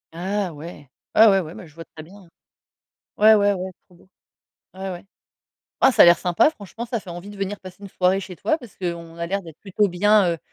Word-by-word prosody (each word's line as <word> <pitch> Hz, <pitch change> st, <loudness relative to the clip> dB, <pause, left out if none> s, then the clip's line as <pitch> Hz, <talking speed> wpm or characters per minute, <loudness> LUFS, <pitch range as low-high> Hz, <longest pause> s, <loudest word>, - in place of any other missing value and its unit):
Ah 190 Hz, 0 st, -3 dB
ouais! 150 Hz, -1 st, -11 dB, 0.3 s
Ouais, 220 Hz, -, +8 dB
ouais, 195 Hz, -2 st, +5 dB
ouais, 165 Hz, -1 st, -6 dB
beh, -, -, -10 dB
je 150 Hz, -, -20 dB
vois 165 Hz, 0 st, -11 dB
très 155 Hz, -, -9 dB
bien, 175 Hz, +5 st, -16 dB
hein. 190 Hz, -4 st, -17 dB, 0.9 s
Ouais, 215 Hz, +1 st, +7 dB
ouais, 205 Hz, -1 st, +3 dB
ouais, 185 Hz, 0 st, -4 dB, 0.2 s
trop 180 Hz, -, -21 dB
beau. 185 Hz, -, -24 dB, 0.7 s
Ouais, 190 Hz, 0 st, -6 dB
ouais. 175 Hz, 0 st, -8 dB, 0.8 s
Ah, 265 Hz, -, +5 dB
ça -, -, +6 dB
a -, -, +9 dB
l'air 170 Hz, 0 st, +6 dB
sympa, 180 Hz, -, +2 dB
franchement, 225 Hz, -, -9 dB
ça 235 Hz, -1 st, -3 dB
fait 190 Hz, -3 st, -11 dB
envie 175 Hz, +4 st, -8 dB
de 205 Hz, -, -11 dB
venir 195 Hz, +1 st, -4 dB
passer 185 Hz, -1 st, -11 dB
une 200 Hz, -, -9 dB
soirée 185 Hz, +1 st, +1 dB
chez 185 Hz, -1 st, -9 dB
toi 315 Hz, -, 0 dB
parce 240 Hz, -7 st, -14 dB
qu'on 170 Hz, -2 st, -6 dB
a 170 Hz, -, -3 dB
l'air 195 Hz, +1 st, -1 dB
d'être 165 Hz, -2 st, -13 dB
plutôt 205 Hz, +1 st, 0 dB
bien, 195 Hz, 0 st, +3 dB
heu, 165 Hz, -, -5 dB
185 Hz, 240 wpm, -22 LUFS, 175-205 Hz, 0.9 s, a